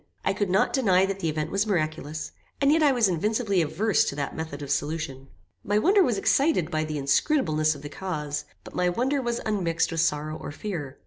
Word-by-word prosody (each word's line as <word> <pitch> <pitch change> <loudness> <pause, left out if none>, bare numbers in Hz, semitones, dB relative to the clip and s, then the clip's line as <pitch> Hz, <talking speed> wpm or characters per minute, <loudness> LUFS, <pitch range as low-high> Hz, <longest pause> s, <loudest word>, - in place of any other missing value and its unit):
I 195 - +2
could 200 0 -1
not 190 +2 +2
deny 190 -8 +4
that 195 0 -3
the 165 - -1
event 155 0 -3
was 200 +2 +1
miraculous, 155 -4 -2 0.3
and 280 0 +4
yet 320 +1 +3
I 295 -2 +5
was 240 -5 +3
invincibly 200 +2 +1
averse 185 +4 +2
to - - -3
that 140 -1 -3
method 155 -3 -5
of 140 - -5
solution. 145 -2 -2 0.4
My 205 +1 +1
wonder 390 - +4
was 245 - +2
excited 270 - +2
by 155 0 0
the 155 -1 -4
inscrutableness 155 - +2
of 140 - -11
the 145 - -6
cause, 150 -4 -4 0.2
but - - -12
my 180 0 +1
wonder 260 +9 0
was 240 -1 -2
unmixed 180 -7 0
with 165 -1 0
sorrow 155 -1 0
or - - -7
fear. 145 -5 -5
175 Hz, 210 wpm, -26 LUFS, 155-215 Hz, 0.4 s, I